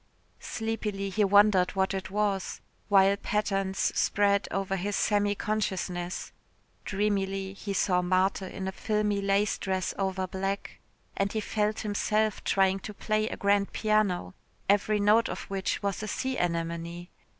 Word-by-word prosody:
Sleepily 210 -3 -3
he 210 +2 +2
wondered 200 -2 +4
what 190 0 +1
it 190 -1 -4
was 200 -1 -1 0.3
while 195 0 +5
patterns 195 -2 -1 0.2
spread 200 -1 +2
over 195 0 -1
his 200 +2 -2
semi 205 +1 +2
consciousness 185 -4 -2 0.5
dreamily 195 -1 -1
he 200 +1 -6
saw 185 -2 +2
Marthe 185 +2 +2
in 190 0 -5
a - - -1
filmy 210 0 0
lace 200 +1 +1
dress 190 -2 -1
over 190 -1 0
black 195 +2 -4 0.4
and 195 0 0
he 220 - 0
felt 215 0 -1
himself 215 0 0
trying 195 0 +2
to 210 +2 -8
play 215 +1 0
on - - -4
a - - -17
grand 200 0 +2
piano, 215 -4 +1 0.3
every 205 +1 +3
note 210 +3 +4
of - - -4
which 195 +1 -2
was 200 0 -1
a 215 - -4
sea 260 +4 -2
anemone. 170 0 -3
195 Hz, 150 wpm, -28 LUFS, 190-210 Hz, 0.5 s, while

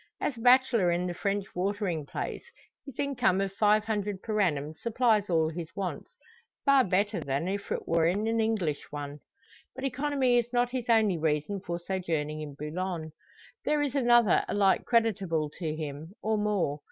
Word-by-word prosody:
As 285 - -1
a - - -11
bachelor 245 -5 +5
in 175 +1 0
the 180 - -2
French 200 +2 -1
watering 185 -5 -2
place, - - -4 0.4
his 275 - -10
income 250 -9 +1
of 195 -1 -1
five 210 +1 +3
hundred 205 -3 -2
per 215 -2 0
annum 150 -5 0
supplies 225 -3 +2
all 160 -2 +3
his 165 0 -6
wants 195 -3 -4 0.6
far 275 -2 +6
better 205 +2 +1
than 140 +5 -2
if 200 +1 -4
it - - -3
were 165 0 +3
in 200 +5 0
an 225 0 +1
English 210 -10 0
one. 145 0 -6 0.6
But 265 - -7
economy 270 -2 +2
is 240 0 -3
not 245 0 +1
his 250 -2 -4
only 215 -6 +3
reason 155 +5 0
for 175 -2 -4
sojourning 165 -4 -3
in 145 -2 -7
Boulogne. 160 +2 -4 0.5
There 300 -1 +1
is 280 -3 -2
another 240 -6 +4
alike 200 -2 +2
creditable 195 -10 +1
to 160 -4 -2
him, 155 +2 -6
or 220 0 +1
more. 205 -9 0
195 Hz, 175 wpm, -29 LUFS, 165-230 Hz, 0.6 s, far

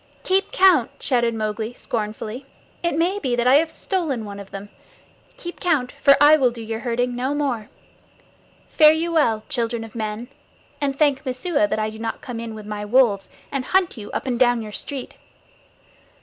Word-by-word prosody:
"Keep 380 +1 +1
count!" 375 - +5
shouted 235 -3 +1
Mowgli 215 +1 -3
scornfully. 220 +3 -4 0.3
"It 340 -3 0
may 360 +5 +1
be 255 -9 -1
that 240 0 0
I 260 +3 +7
have 320 +2 +2
stolen 315 - -2
one 200 -1 -8
of 200 -1 -10
them. 200 +1 -8 0.7
Keep 345 0 -8
count, 290 -8 +1
for 280 0 +6
I 295 +2 +7
will 260 -4 +3
do 235 -1 -8
your 225 0 -4
herding 245 +1 -1
no 260 +4 -1
more. 255 -7 -2 1.0
Fare 305 0 +6
you 330 +2 -1
well, 230 -10 +2
children 235 -1 -2
of 225 - -11
men, 220 +1 -4 0.5
and 275 -1 -1
thank 285 -3 +2
Messua 290 +4 0
that - - -1
I 215 0 -1
do 220 - -10
not 225 0 -4
come 240 -2 -6
in 230 -1 -6
with 215 -1 -9
my 210 0 -5
wolves 210 -3 +3 0.2
and 275 -2 -2
hunt 370 +4 +1
you 210 -3 -8
up - - -3
and 245 -3 -1
down 245 -2 +3
your 210 - -8
street." 270 +4 -6
245 Hz, 190 wpm, -22 LUFS, 220-290 Hz, 1.0 s, I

